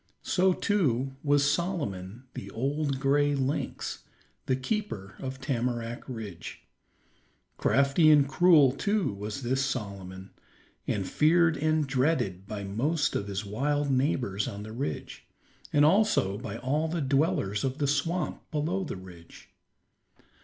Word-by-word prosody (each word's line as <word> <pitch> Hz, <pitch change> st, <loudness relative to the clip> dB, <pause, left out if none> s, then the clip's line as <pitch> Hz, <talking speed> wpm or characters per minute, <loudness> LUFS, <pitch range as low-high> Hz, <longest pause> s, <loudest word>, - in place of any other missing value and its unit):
So 190 Hz, 0 st, +3 dB
too 135 Hz, -, 0 dB
was 145 Hz, -1 st, +3 dB
Solomon, 140 Hz, -, -2 dB
the 100 Hz, -, -7 dB
old 140 Hz, +5 st, -1 dB
gray 145 Hz, +1 st, +2 dB
lynx, 135 Hz, +1 st, -2 dB, 0.4 s
the 130 Hz, -, +2 dB
keeper 130 Hz, -, -3 dB
of 130 Hz, 0 st, -5 dB
Tamarack 120 Hz, -3 st, -2 dB
Ridge. 105 Hz, -9 st, -7 dB, 0.9 s
Crafty 140 Hz, +4 st, +4 dB
and 145 Hz, -2 st, +6 dB
cruel 150 Hz, -2 st, +5 dB
too 200 Hz, -, 0 dB
was 105 Hz, +6 st, -5 dB
this 130 Hz, +3 st, +1 dB
Solomon, 100 Hz, -7 st, -5 dB, 0.6 s
and 95 Hz, -3 st, -1 dB
feared 165 Hz, +1 st, +4 dB
and 155 Hz, +1 st, +1 dB
dreaded 130 Hz, -, 0 dB
by 105 Hz, -1 st, -5 dB
most 140 Hz, +11 st, 0 dB
of 100 Hz, -, -2 dB
his 100 Hz, 0 st, -3 dB
wild 140 Hz, +7 st, 0 dB
neighbors 130 Hz, -7 st, 0 dB
on 105 Hz, -4 st, -6 dB
the 110 Hz, -, -8 dB
ridge, 130 Hz, +6 st, -5 dB, 0.4 s
and 145 Hz, 0 st, +5 dB
also 170 Hz, -, +3 dB
by 105 Hz, -1 st, -6 dB
all 150 Hz, +5 st, 0 dB
the 165 Hz, +1 st, -2 dB
dwellers 135 Hz, -8 st, +1 dB
of 135 Hz, 0 st, -1 dB
the 145 Hz, -, 0 dB
swamp 155 Hz, +5 st, -1 dB
below 165 Hz, +5 st, -1 dB
the 150 Hz, -, -5 dB
ridge. 90 Hz, -3 st, -13 dB
135 Hz, 130 wpm, -28 LUFS, 105-150 Hz, 0.9 s, and